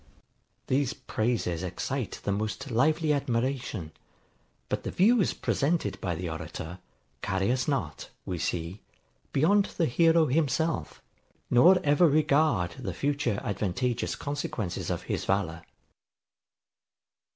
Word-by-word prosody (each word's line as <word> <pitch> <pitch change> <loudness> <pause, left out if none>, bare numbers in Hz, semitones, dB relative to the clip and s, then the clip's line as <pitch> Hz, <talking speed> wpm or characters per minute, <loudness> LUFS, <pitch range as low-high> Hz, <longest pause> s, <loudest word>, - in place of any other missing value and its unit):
These 130 -2 0
praises 110 -7 -1
excite 105 +6 -3
the 100 - 0
most 110 +6 -3
lively 155 +6 +2
admiration; 125 - -2 0.8
but - - -2
the - - -4
views 215 +2 +4
presented 140 - 0
by 85 -2 -1
the 90 +2 -4
orator, 80 +2 -6 0.4
carry 95 +3 0
us 130 0 0
not, 100 - -2 0.2
we 90 -2 -3
see, 85 +4 -3 0.5
beyond 195 +8 +4
the 170 - +3
hero 165 +4 +4
himself, 160 +2 0 0.5
nor 175 +10 +7
ever 150 +4 +5
regard 145 - +3
the 95 -9 -4
future 140 -6 0
advantageous 110 +5 -1
consequences 140 -10 -4
of - - -2
his - - -2
valour. 90 -4 0
125 Hz, 115 wpm, -28 LUFS, 95-150 Hz, 0.8 s, nor